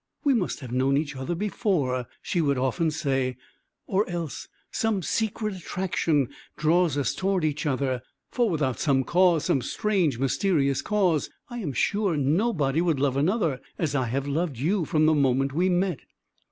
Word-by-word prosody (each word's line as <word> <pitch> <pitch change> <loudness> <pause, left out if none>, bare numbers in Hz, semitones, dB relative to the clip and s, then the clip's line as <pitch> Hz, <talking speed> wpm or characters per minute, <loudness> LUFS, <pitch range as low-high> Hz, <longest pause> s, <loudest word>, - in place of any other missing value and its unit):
"We 280 - +4
must 195 -9 -1
have 125 -3 -8
known 130 +2 +2
each 145 -1 -2
other 135 +6 -3
before," 165 - -1 0.2
she 175 - 0
would 140 -3 +1
often 135 +6 +1
say, 135 -5 -1 0.5
"or 195 +1 0
else 170 -4 -4 0.2
some 220 -4 0
secret 215 +2 -1
attraction 170 -6 0 0.3
draws 160 -1 +2
us 140 - 0
toward 190 -3 0
each 150 0 -1
other; 130 -2 0 0.3
for 240 -3 +1
without 145 - -1
some 135 -3 +2
cause, 175 0 +3
some 135 - +2
strange, 180 - 0
mysterious 140 - +1
cause, 185 -8 +1 0.2
I 240 - -5
am 160 -11 -3
sure 200 - +1
nobody 155 - +1
would 165 -5 +1
love 135 -1 +1
another 155 - +1 0.2
as 155 -4 -1
I 130 -4 0
have 135 +4 -2
loved 150 -1 -1
you 170 - 0
from 155 +1 +2
the 155 - +5
moment 135 -2 +2
we 180 +5 +2
met." 180 -4 +1
155 Hz, 165 wpm, -26 LUFS, 135-185 Hz, 0.5 s, the